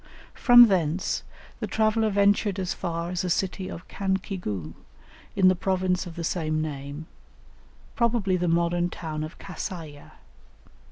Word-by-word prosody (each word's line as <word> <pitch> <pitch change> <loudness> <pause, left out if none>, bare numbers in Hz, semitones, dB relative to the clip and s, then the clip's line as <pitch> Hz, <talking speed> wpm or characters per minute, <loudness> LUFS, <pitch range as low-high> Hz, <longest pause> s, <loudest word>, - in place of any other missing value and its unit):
From 240 -1 +8
thence, 180 -2 0 0.4
the - - -3
traveller 220 0 +2
ventured 200 0 +2
as 185 -2 -2
far 170 -1 -3
as 180 - -1
the 185 - -2
city 185 +1 -1
of 165 - -9
Cancigu, 185 - -3 0.6
in 190 -2 +5
the 185 - +6
province 185 0 0
of 165 - -9
the 170 - -5
same 155 -2 -1
name, 145 0 -5 0.9
probably 230 -6 +1
the 180 -1 0
modern 170 +1 +1
town 155 -3 -5
of 155 - -8
Kassaye. 160 -6 -7
180 Hz, 135 wpm, -26 LUFS, 165-195 Hz, 0.9 s, From